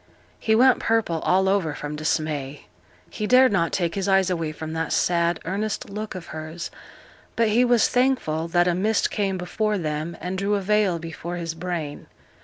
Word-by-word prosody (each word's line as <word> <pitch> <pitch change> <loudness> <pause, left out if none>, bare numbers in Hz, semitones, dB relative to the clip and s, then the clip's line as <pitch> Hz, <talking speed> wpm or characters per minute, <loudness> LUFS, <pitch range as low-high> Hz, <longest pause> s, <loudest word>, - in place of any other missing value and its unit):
He 220 - +2
went 255 +2 +5
purple 225 -8 +1
all 190 +4 +2
over 190 -6 +1
from 150 0 -5
dismay; 150 -2 -2 0.5
he 215 - -3
dared 255 +1 +6
not 170 -4 +1
take 170 -3 -1
his 195 -1 -2
eyes 190 -1 +3
away 165 -3 -1
from 160 +1 -6
that 160 -1 -2
sad, 170 -1 +1
earnest 200 +3 -3
look 210 0 -5
of 180 -2 -7
hers, 155 +2 -6 0.6
but 230 -1 +2
he 230 +4 +4
was 240 -2 +4
thankful 245 -12 +1
that 175 +1 +2
a 175 - +3
mist 205 +5 +1
came 195 -3 -1
before 210 +4 -1
them 155 0 -3
and 185 +1 -4
drew 200 +1 +1
a 200 - -1
veil 205 -2 +2
before 165 +1 -6
his 165 -2 -4
brain. 165 -3 -5
180 Hz, 185 wpm, -24 LUFS, 165-210 Hz, 0.6 s, dared